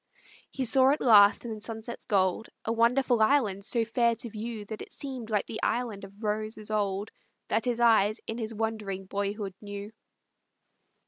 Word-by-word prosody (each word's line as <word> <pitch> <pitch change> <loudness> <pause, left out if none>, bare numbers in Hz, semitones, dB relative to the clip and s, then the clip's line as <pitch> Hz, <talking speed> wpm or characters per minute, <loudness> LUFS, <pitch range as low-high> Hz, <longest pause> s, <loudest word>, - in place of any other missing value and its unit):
He 265 - -3
saw 260 +3 +5
at 290 - +2
last 210 -2 +6
in 230 - -3
the 215 - -8
sunset's 225 +2 -6
gold, 190 +2 +1 0.2
A 225 - 0
wonderful 235 +1 +3
island 215 -5 +2
so 230 +2 0
fair 235 0 +2
to 230 0 -6
view 220 0 -5
That 215 +1 -7
it - - -9
seemed 260 -5 -6
like 210 -2 +1
the 220 - -6
Island 230 -5 -1
of 200 +3 -15
Roses 215 0 -2
old 205 0 -1 0.4
That 225 - +1
his 240 -1 0
eyes 220 -2 +4
in 225 +2 -4
his 220 -1 -3
wondering 215 -3 -3
boyhood 200 0 -3
knew. 205 0 -7
220 Hz, 175 wpm, -28 LUFS, 205-235 Hz, 0.4 s, last